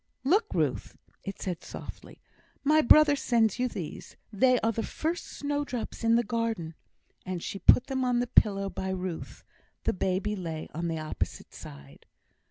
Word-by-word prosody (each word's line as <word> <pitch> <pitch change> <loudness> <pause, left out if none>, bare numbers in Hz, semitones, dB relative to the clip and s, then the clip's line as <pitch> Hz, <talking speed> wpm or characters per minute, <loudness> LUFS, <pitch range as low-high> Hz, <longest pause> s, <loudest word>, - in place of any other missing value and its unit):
"Look, 400 - +3
Ruth!" - - -1 0.3
it 195 - -6
said, 180 -3 -4
softly, - - -10 0.4
"my 305 +2 +5
brother 300 +3 +7
sends 235 -5 +1
you 250 - +2
these. 190 -10 -7 0.2
They 250 +4 +4
are 225 - +2
the 225 - -2
first 330 +8 -3
snowdrops 285 -5 -4
in 230 0 +4
the 235 - +3
garden." 225 -7 -2 0.5
And 185 -2 -4
she 195 - -5
put 250 - +6
them 265 -2 -2
on 250 -1 +2
the 245 - +1
pillow 200 -5 +3
by 190 -1 -4
Ruth; 185 -2 -5 0.4
the - - +1
baby 190 +3 -1
lay 165 -5 -5
on 170 +2 -2
the 165 -1 -2
opposite 155 0 -4
side. 70 0 -12
225 Hz, 165 wpm, -28 LUFS, 185-255 Hz, 0.5 s, brother